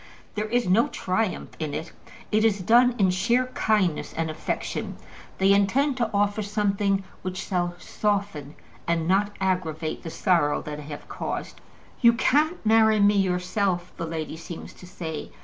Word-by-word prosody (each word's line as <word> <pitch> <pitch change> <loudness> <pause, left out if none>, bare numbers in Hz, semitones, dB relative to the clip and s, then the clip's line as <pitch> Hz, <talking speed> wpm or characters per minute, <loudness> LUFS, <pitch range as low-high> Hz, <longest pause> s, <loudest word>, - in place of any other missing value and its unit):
There 210 0 -2
is 240 0 0
no 210 +6 +4
triumph 185 +2 -2
in 155 -3 -3
it. 160 - -5 0.4
It 215 0 +3
is 220 -3 +3
done 240 +5 +5
in 190 -3 +3
sheer 235 +7 +2
kindness 190 -8 +1
and 160 -1 -1
affection. 155 - -4 0.4
They 195 +1 +4
intend 255 +8 +2
to 235 -3 0
offer 205 0 +1
something 200 -1 0 0.2
which 185 0 -4
shall 175 -2 -2
soften 200 -8 -2 0.3
and 165 -1 0
not 200 +2 +2
aggravate 170 -5 -1
the 165 - -6
sorrow 160 -3 +1
that 150 0 -6
they 150 - -8
have 145 0 -8
caused. - - -5 0.4
"You 235 -2 +7
can't 300 +6 +1
marry 220 0 +5
me 205 0 +5
yourself," 180 -1 0
the 165 - -4
lady 160 -1 -4
seems 165 0 -9
to 180 - -14
say. 160 -4 -6
195 Hz, 160 wpm, -25 LUFS, 170-215 Hz, 0.4 s, You